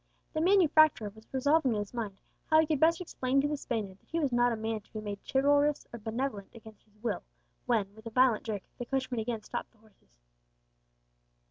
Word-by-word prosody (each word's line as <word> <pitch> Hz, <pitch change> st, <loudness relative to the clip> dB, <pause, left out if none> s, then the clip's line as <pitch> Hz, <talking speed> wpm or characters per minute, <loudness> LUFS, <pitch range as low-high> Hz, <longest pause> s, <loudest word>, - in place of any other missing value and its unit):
The 310 Hz, -, 0 dB
manufacturer 310 Hz, -, +4 dB
was 220 Hz, 0 st, -18 dB
revolving 270 Hz, 0 st, +3 dB
in -, -, -1 dB
his 205 Hz, -, -7 dB
mind 215 Hz, -5 st, -4 dB, 0.3 s
how 315 Hz, -, +6 dB
he 320 Hz, -, +5 dB
could 305 Hz, -2 st, 0 dB
best 330 Hz, +3 st, +4 dB
explain 270 Hz, -6 st, 0 dB
to 285 Hz, -, +2 dB
the 295 Hz, -, -1 dB
Spaniard 215 Hz, -8 st, -4 dB
that -, -, -34 dB
he 335 Hz, -, -1 dB
was 285 Hz, -5 st, 0 dB
not 240 Hz, 0 st, +3 dB
a -, -, 0 dB
man 220 Hz, 0 st, -3 dB
to -, -, -30 dB
be 215 Hz, -, -4 dB
made 205 Hz, -1 st, -5 dB
chivalrous 285 Hz, +2 st, +3 dB
or 235 Hz, -, -6 dB
benevolent 220 Hz, -1 st, -3 dB
against 220 Hz, -2 st, -14 dB
his 215 Hz, -1 st, -30 dB
will, 235 Hz, -, -1 dB, 0.5 s
when, 210 Hz, -5 st, +1 dB
with 220 Hz, +1 st, -11 dB
a -, -, -3 dB
violent 250 Hz, -1 st, +3 dB
jerk, 210 Hz, -4 st, -4 dB, 0.2 s
the 245 Hz, -, -3 dB
coachman 260 Hz, -2 st, -1 dB
again 220 Hz, -1 st, -3 dB
stopped -, -, -5 dB
the -, -, -28 dB
horses. 205 Hz, -, -27 dB
240 Hz, 215 wpm, -30 LUFS, 215-285 Hz, 0.5 s, how